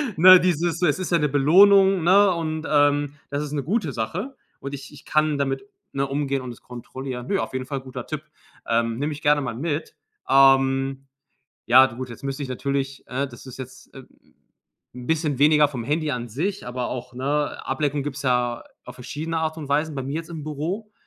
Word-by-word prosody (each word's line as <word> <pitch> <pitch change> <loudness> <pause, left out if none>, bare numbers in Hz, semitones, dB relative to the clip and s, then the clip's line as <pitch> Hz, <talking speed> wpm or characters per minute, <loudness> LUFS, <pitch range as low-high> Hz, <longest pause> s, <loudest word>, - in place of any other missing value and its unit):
ne, 185 +3 +9
dieses 170 -1 0
so, 180 - +2
es 145 - +2
ist 185 -1 -4
ja 170 - +4
'ne 150 - +2
Belohnung, 190 +6 +5
ne, 195 +3 +5
und, 160 -2 -3
ähm, 145 -1 +2
das 145 +1 -2
ist 150 - -6
'ne 145 -2 -2
gute 185 - -1
Sache. 115 - -4 0.3
Und 140 +1 -6
ich 140 +1 -8
ich 145 - -14
kann 155 -1 +1
damit, 135 -1 -2 0.3
ne, 140 0 -1
umgehen 140 -1 -1
und 125 -1 -6
das 120 - -13
kontrollieren. 125 +1 -7
Ne, 200 - 0
auf - - -4
jeden 130 0 -4
Fall 135 0 -4
guter 130 -2 -8
Tipp. 155 -1 -5 0.4
Ähm, 115 0 0
nehme 145 +4 -2
ich 150 0 -7
gerne 145 0 +3
mal 120 -4 -4
mit. 155 +4 -3 0.4
Ähm. 135 0 +4 0.6
Ja, 130 +3 +8
du 120 -3 -6
gut, 130 0 -5
jetzt 120 - -11
müsste 135 +1 -4
ich 135 - -5
natürlich, 135 +1 -3
ne 135 +2 -2
das 120 -1 -13
ist 130 - -10
jetzt, 130 0 -10
äh 135 - -11 0.9
'n 125 -1 -8
bisschen 155 -3 0
weniger 150 0 +5
vom 130 -5 -6
Handy 150 +4 -1
an 120 -2 -4
sich, 185 - -3
aber 125 0 -3
auch, 125 0 -6
ne, 145 +3 -1
Ablenkung 145 +1 -1
gibt's 145 0 -5
ja 125 -2 0 0.2
auf 125 - -10
verschiedene 155 +6 -5
Art 160 0 -2
und 150 -3 -7
Weisen, 150 +2 +1
bei 135 - -2
mir 140 +3 -4
jetzt 165 +1 -5
im 160 -3 -6
Büro. 165 +9 -4
140 Hz, 210 wpm, -23 LUFS, 130-155 Hz, 0.9 s, ne